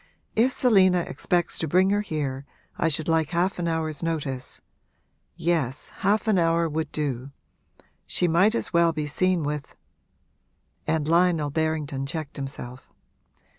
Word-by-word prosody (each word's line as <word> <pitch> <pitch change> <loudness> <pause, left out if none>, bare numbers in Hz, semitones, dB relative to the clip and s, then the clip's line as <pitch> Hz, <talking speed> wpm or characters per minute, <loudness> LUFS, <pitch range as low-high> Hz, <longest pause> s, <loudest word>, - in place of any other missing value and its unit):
If 240 +4 +4
Selina 190 -9 +4
expects 175 0 -1
to 160 - -1
bring 185 +5 +3
her 205 0 +2
here 145 -8 -3 0.3
I - - +1
should 160 0 -1
like 160 -2 +2
half 180 +3 0
an 170 - -1
hour's 160 -2 -2
notice; 145 -6 -3 0.8
yes, 160 -6 -1
half 215 +3 +1
an 205 -4 +4
hour 165 0 +2
would 160 0 -3
do. 140 -3 -3 0.8
She 180 - +1
might 190 +7 +4
as - - -1
well 170 -1 +4
be 155 -1 -2
seen 180 +3 +1
with 145 -1 -4 0.5
' - - -44
And 155 -2 0
Lionel 165 -3 +3
Berrington 155 -3 -1
checked 155 -2 -5
himself. 135 -2 -7
160 Hz, 145 wpm, -25 LUFS, 145-175 Hz, 0.8 s, If